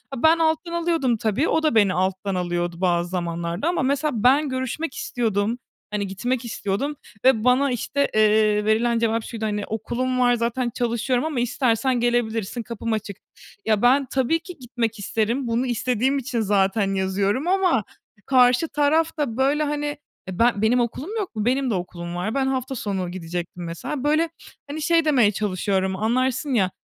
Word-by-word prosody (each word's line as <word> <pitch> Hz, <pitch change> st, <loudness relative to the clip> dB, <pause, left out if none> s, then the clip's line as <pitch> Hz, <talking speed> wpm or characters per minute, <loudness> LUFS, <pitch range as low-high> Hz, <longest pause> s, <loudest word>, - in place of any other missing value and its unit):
Ben 320 Hz, +6 st, +4 dB
alttan 320 Hz, +1 st, +1 dB
alıyordum, 330 Hz, -8 st, +1 dB
tabii, 220 Hz, +8 st, 0 dB
o 320 Hz, -, +1 dB
da 310 Hz, -7 st, +2 dB
beni 205 Hz, -4 st, +4 dB
alttan 190 Hz, +1 st, -1 dB
alıyordu 175 Hz, -1 st, -2 dB
bazı 175 Hz, -1 st, +1 dB
zamanlarda 170 Hz, -, -3 dB
ama 350 Hz, -, +1 dB
mesela 280 Hz, +3 st, +1 dB
ben 280 Hz, +4 st, +4 dB
görüşmek 260 Hz, +3 st, -3 dB
istiyordum. 225 Hz, -1 st, -1 dB, 0.4 s
Hani, 205 Hz, -1 st, -1 dB
gitmek 240 Hz, +6 st, -2 dB
istiyordum 230 Hz, +6 st, -2 dB, 0.3 s
ve 260 Hz, -5 st, +5 dB
bana, 255 Hz, +3 st, +3 dB
işte, 280 Hz, +4 st, -1 dB
eee, 215 Hz, -1 st, +3 dB
verilen 230 Hz, +2 st, +2 dB
cevap 230 Hz, 0 st, 0 dB
şuydu, 225 Hz, -1 st, -5 dB
hani, 210 Hz, -1 st, -2 dB
"Okulum 255 Hz, +4 st, -2 dB
var 245 Hz, -1 st, +4 dB
zaten 235 Hz, +1 st, -1 dB
çalışıyorum 245 Hz, +2 st, 0 dB
ama 305 Hz, -5 st, -2 dB
istersen 245 Hz, 0 st, +1 dB
gelebilirsin, 235 Hz, -2 st, -1 dB
kapım 230 Hz, 0 st, -4 dB
açık." 210 Hz, -3 st, -4 dB, 0.5 s
Ya, 215 Hz, -2 st, +2 dB
ben 265 Hz, +3 st, +4 dB
tabii 270 Hz, +5 st, +1 dB
ki 355 Hz, +1 st, -11 dB
gitmek 235 Hz, -3 st, -3 dB
isterim 225 Hz, +5 st, -1 dB
bunu 235 Hz, +2 st, 0 dB
istediğim 250 Hz, +2 st, 0 dB
için 255 Hz, -2 st, -2 dB
zaten 195 Hz, -1 st, +1 dB
yazıyorum 195 Hz, -, 0 dB
ama 370 Hz, -, +2 dB, 0.4 s
karşı 250 Hz, +3 st, +4 dB
taraf 310 Hz, +3 st, +1 dB
da, 265 Hz, -7 st, -2 dB
böyle, 280 Hz, +3 st, +2 dB
hani, 295 Hz, 0 st, -2 dB
eee, 290 Hz, -10 st, -8 dB
ben 230 Hz, -3 st, +3 dB
benim 230 Hz, +3 st, +3 dB
okulum 265 Hz, -, -3 dB
yok 390 Hz, -, -5 dB
mu? 215 Hz, -1 st, -2 dB
Benim 260 Hz, +2 st, +1 dB
de -, -, 0 dB
okulum 175 Hz, -2 st, -5 dB
var. 180 Hz, +5 st, -2 dB
Ben 270 Hz, -1 st, +1 dB
hafta 265 Hz, 0 st, -2 dB
sonu 190 Hz, -6 st, -3 dB
gidecektim 175 Hz, 0 st, -5 dB
mesela. 170 Hz, -, -5 dB
Böyle, 310 Hz, +3 st, +2 dB, 0.4 s
hani, 305 Hz, +2 st, -5 dB
şey 330 Hz, +1 st, +3 dB
demeye 250 Hz, -9 st, +4 dB
çalışıyorum 190 Hz, -1 st, -1 dB
anlarsın 255 Hz, +6 st, 0 dB
ya, 190 Hz, -6 st, +2 dB
235 Hz, 170 wpm, -23 LUFS, 205-270 Hz, 0.5 s, ve